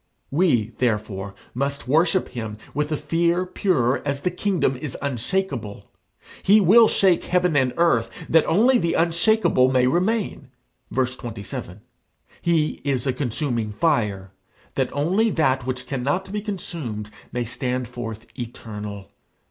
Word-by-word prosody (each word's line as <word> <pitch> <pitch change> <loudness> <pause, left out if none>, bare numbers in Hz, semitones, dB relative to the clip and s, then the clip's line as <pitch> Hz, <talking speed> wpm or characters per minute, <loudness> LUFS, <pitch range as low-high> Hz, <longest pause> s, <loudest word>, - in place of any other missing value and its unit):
We, 135 - +2
therefore, 105 -5 -1 0.2
must 140 +1 -2
worship 165 +7 +2
him 110 -4 -5 0.2
with 150 +1 -1
a 155 - +1
fear 170 +4 +1
pure 150 -9 +1
as 140 -1 -2
the 180 - 0
kingdom 180 -7 0
is 135 -1 -5
unshakeable. 130 - -3 0.5
He 205 +3 +6
will 215 +4 +7
shake 190 -5 +3
heaven 180 -2 +2
and 130 -3 +3
earth, 165 -10 +3 0.2
that 160 -1 +4
only 240 +8 +4
the 170 -3 0
unshakeable 170 - +3
may 130 -1 +3
remain, 190 - 0 0.4
(verse 130 -1 0
27): 110 -3 -7 0.6
he 165 -3 +1
is 135 -3 -1
a 130 - +1
consuming 120 -4 -2
fire, 105 - 0 0.4
that - - -1
only 185 +10 +2
that 130 - +1
which 130 0 -3
cannot 140 +8 -2
be 210 0 -2
consumed 155 - -5 0.2
may 125 -1 -2
stand 125 +1 -2
forth 115 -2 -7
eternal. 105 -4 -7
140 Hz, 135 wpm, -23 LUFS, 120-170 Hz, 0.6 s, will